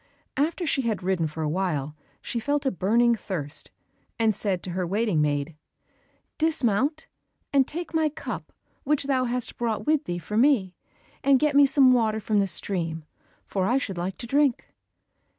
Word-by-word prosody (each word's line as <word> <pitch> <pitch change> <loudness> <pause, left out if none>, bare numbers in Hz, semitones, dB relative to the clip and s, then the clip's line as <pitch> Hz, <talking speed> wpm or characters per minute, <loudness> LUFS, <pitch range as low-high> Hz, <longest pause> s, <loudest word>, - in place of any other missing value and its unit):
After 325 +5 0
she 280 -3 +1
had 220 -6 -2
ridden 180 -3 +1
for 155 +1 -5
a - - 0
while 155 -4 -2 0.3
she 235 - -3
felt 285 +4 -1
a 265 - +2
burning 235 +6 +3
thirst, 160 -9 -4 0.5
and 225 -2 +3
said 190 -4 -1
to 180 - -5
her 180 0 -2
waiting 200 -3 +1
maid, 145 +1 -1 0.8
"Dismount, 300 -1 +1 0.5
and 275 -2 +4
take 340 +1 -5
my 320 -1 +2
cup 310 +2 -7 0.3
which 295 0 +1
thou 265 -2 +1
hast 245 -1 -1
brought 230 -3 -1
with 305 0 +2
thee 175 - -3
for 190 +5 -4
me, 235 -8 +3 0.5
and 275 -1 +5
get 295 +1 +1
me 285 0 +7
some 270 -1 +5
water 220 -3 +2
from 215 -1 +1
the 200 - +2
stream, 165 -2 -2 0.4
for 190 -1 -1
I 250 - +3
should 195 -10 -3
like 185 +2 -3
to - - -5
drink." 275 0 +1
225 Hz, 175 wpm, -26 LUFS, 185-275 Hz, 0.8 s, me